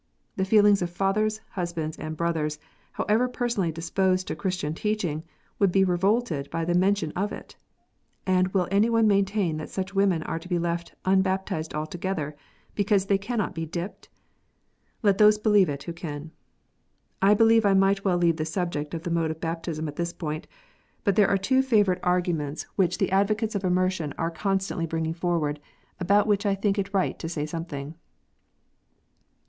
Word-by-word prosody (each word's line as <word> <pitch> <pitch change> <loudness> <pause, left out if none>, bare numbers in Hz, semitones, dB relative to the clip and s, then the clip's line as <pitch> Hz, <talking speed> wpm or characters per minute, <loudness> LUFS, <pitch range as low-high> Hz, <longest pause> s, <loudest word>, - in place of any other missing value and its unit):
The 190 - 0
feelings 205 -1 +5
of 175 - -1
fathers, 210 +4 0
husbands, 170 -4 -3
and 155 0 -6
brothers, 155 -3 -1 0.4
however 225 +4 +1
personally 235 -9 -1
disposed 185 +3 0
to - - -2
Christian 180 -6 -2
teaching, 180 -5 -2 0.4
would 200 -3 +4
be 195 +1 +4
revolted 185 -4 +1
by 165 0 -2
the 175 - 0
mention 185 -2 +2
of 200 +5 -2
it. - - -9 0.7
And 185 -1 +3
will 185 -1 0
any 205 +4 +3
one 230 -1 +3
maintain 195 -4 +2
that 155 - -6
such 190 0 -4
women 195 -5 +2
are. 165 - -3
to 180 - -12
be 175 - +1
left 170 0 -3
un 190 0 +4
baptized 190 -4 -2
altogether 155 -1 -3 0.4
because 200 -1 +2
they 195 0 +2
cannot 215 0 -2
be 165 -2 -4
" - - -11
dipped 175 +5 -6 0.5
"? - - -44
Let 200 -2 +3
those 210 0 +7
believe 210 -4 +4
it 140 -1 -4
who 170 - -5
can. 155 -2 -7 0.9
I 200 +2 +6
believe 225 +1 +5
I 200 -1 +4
might 195 +1 +3
well 185 -3 +2
leave 170 -2 +2
the 155 - -1
subject 160 -2 -3
of 165 - -5
the 175 - -3
mode 165 -1 +1
of 160 0 -5
baptism 165 -1 -3
at 145 - -7
this 170 0 -2
point. 155 -1 -5 0.6
But 200 -3 +2
there 205 -1 +5
are 200 - +3
two 260 +8 +2
favourite 205 -8 +2
arguments 175 -5 0
04 - - -20
KNOTS - - -32
UNTIED. - - -15
which 180 -1 +2
the - - 0
advocates 210 +3 +1
of 200 -2 -2
immersion 185 -4 0
are 165 +1 -1
constantly 195 -2 -1
bringing 160 0 -2
forward, 165 -4 -1 0.4
about 200 +3 +3
which 205 -1 +1
I 200 - +2
think 200 +1 0
it 195 0 -2
right 195 -2 0
to 165 - -4
say 150 -3 -2
something. 155 -2 -6
185 Hz, 185 wpm, -26 LUFS, 165-200 Hz, 0.9 s, those